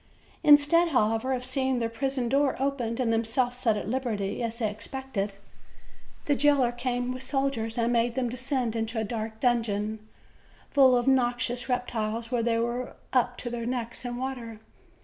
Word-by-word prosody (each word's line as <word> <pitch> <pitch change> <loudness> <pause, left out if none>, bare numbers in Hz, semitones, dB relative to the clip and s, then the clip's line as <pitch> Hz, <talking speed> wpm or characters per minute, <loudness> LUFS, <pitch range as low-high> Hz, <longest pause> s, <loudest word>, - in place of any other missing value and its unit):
Instead, 300 +3 +6
however, 225 -1 +1
of 255 -1 -1
seeing 265 -1 0
their 230 -1 0
prison 260 +2 -2
door 275 +2 +2
opened 260 -4 -1
and 235 -3 +1
themselves 245 +2 0
set 225 -4 +2
at - - -4
liberty, 225 -5 -2
as 230 -1 -2
they 230 -3 0
expected, 215 -1 -4 0.9
the 290 - +2
jailer 280 -3 +3
came 245 0 -2
with 255 - -7
soldiers, 265 -4 -1
and 235 +1 +1
made 235 0 +1
them 260 -2 0
descend 250 -1 -1
into 225 +1 -2
a - - 0
dark 220 0 -4
dungeon, 220 -3 0 0.7
full 265 -3 +6
of 240 - 0
noxious 245 -1 +1
reptiles, 230 -2 -2
where 245 -2 +1
they 230 0 +1
were 240 +2 -2 0.2
up 245 -1 +2
to - - -6
their 235 -1 -3
necks 240 -2 -3
in 245 -1 -4
water. 245 -4 -5
245 Hz, 170 wpm, -27 LUFS, 230-260 Hz, 0.9 s, Instead